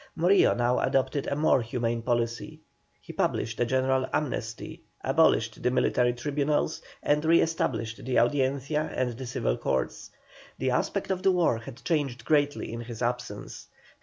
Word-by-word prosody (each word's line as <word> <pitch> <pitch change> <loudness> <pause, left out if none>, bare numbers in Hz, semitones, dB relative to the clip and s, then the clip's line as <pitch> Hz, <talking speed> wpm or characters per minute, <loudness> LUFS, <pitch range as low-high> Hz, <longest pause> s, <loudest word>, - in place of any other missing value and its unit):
Morillo 180 +4 +4
now 120 +1 +1
adopted 135 +1 0
a - - -1
more 150 -3 +3
humane 115 0 -2
policy. 120 +5 -2 0.4
He - - -11
published 110 0 -1
a 120 - +2
general 130 +1 +1
amnesty, 120 -6 -3 0.2
abolished - - +2
the - - +2
military 125 -1 +2
tribunals, 145 +4 -1 0.2
and 150 +1 +2
re 165 +1 +5
established 115 -8 -1
the 125 +1 0
Audiencia 140 +4 +1
and 125 -1 0
the 130 +1 -7
Civil - - -1
Courts. 65 - -2 0.5
The 130 0 0
aspect 195 +10 -1
of 185 -1 -1
the 190 - +4
war 170 -10 +2
had 120 +2 -11
changed 140 -7 -1
greatly 145 -5 +1
in 115 - -5
his 120 0 -6
absence. 120 -3 -4
130 Hz, 155 wpm, -27 LUFS, 120-150 Hz, 0.5 s, re